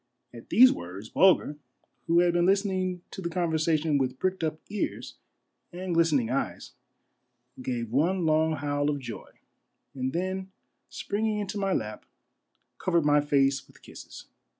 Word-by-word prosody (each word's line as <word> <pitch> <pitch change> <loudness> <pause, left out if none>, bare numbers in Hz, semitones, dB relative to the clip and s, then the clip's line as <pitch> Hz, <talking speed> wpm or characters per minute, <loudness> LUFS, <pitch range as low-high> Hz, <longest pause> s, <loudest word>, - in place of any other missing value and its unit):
At 115 -1 -12
these 255 +3 +7
words 95 +5 -8
Bulger, 180 -5 +3 0.5
who 170 +1 +4
had 175 -1 +2
been 175 0 +2
listening 185 -2 0
to - - -7
the 170 - -3
conver 170 -1 -1
sation 155 -2 +1
with 130 -1 -1
pricked 185 +1 -1
up 155 0 -2
earn 210 - -2 0.7
and 180 0 -4
glistening 155 -8 +2
eyes, 135 - -3 0.9
gave 120 -3 -3
one 170 +7 +1
long 160 0 +2
howl 145 0 -1
of 145 - 0
joy, 120 -5 -8 0.6
and 130 -1 -3
then 185 +3 -3 0.4
springing 215 +1 -2
into 205 0 -3
my 195 -1 0
lap, 105 -1 -4 0.7
covered 170 -4 +1
my 145 0 +4
face 140 -2 +1
with - - -22
kisses. - - -11
160 Hz, 150 wpm, -27 LUFS, 140-185 Hz, 0.9 s, these